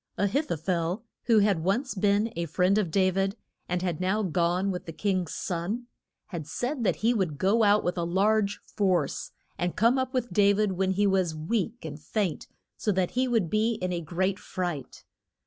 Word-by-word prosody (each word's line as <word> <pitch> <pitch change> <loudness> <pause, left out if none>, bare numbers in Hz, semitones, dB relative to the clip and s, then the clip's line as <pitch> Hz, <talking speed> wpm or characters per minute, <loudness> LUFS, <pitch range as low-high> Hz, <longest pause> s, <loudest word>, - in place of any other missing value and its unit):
A 200 - +2
hith 280 +10 0
o - - +2
phel, 175 +5 -1 0.2
who 230 -2 +4
had 200 -6 +3
once 235 +9 0
been 205 +2 +1
a 170 0 -2
friend 185 +6 +2
of 195 -5 0
Da 185 +3 +3
vid, 195 +2 0 0.3
and 180 0 -1
had 175 -2 -2
now 200 +4 +1
gone 180 +2 +1
with 180 -2 -5
the - - -4
king's 185 -3 -1
son, 195 +7 -3 0.4
had 165 -6 -5
said 245 - -2
that 210 - +2
he 230 +3 +2
would 185 -10 -1
go 200 +8 +3
out 210 0 +4
with 175 0 -1
a - - 0
large 200 +4 +2
force 190 -4 0 0.3
and 175 0 -1
come 235 +4 +3
up 260 0 -1
with 250 -2 -2
Da 200 -1 +5
vid 210 0 +1
when 190 +1 0
he 205 +2 +2
was 190 -5 +2
weak 210 +7 -2
and 150 -1 -6
faint, 175 +1 -2 0.3
so 210 - 0
that 185 -2 0
he 255 +1 +1
would 225 -8 +1
be 220 +5 +1
in 185 -3 -2
a 170 - -2
great 185 +4 -1
fright. 175 -8 -5
195 Hz, 205 wpm, -27 LUFS, 175-215 Hz, 0.4 s, Da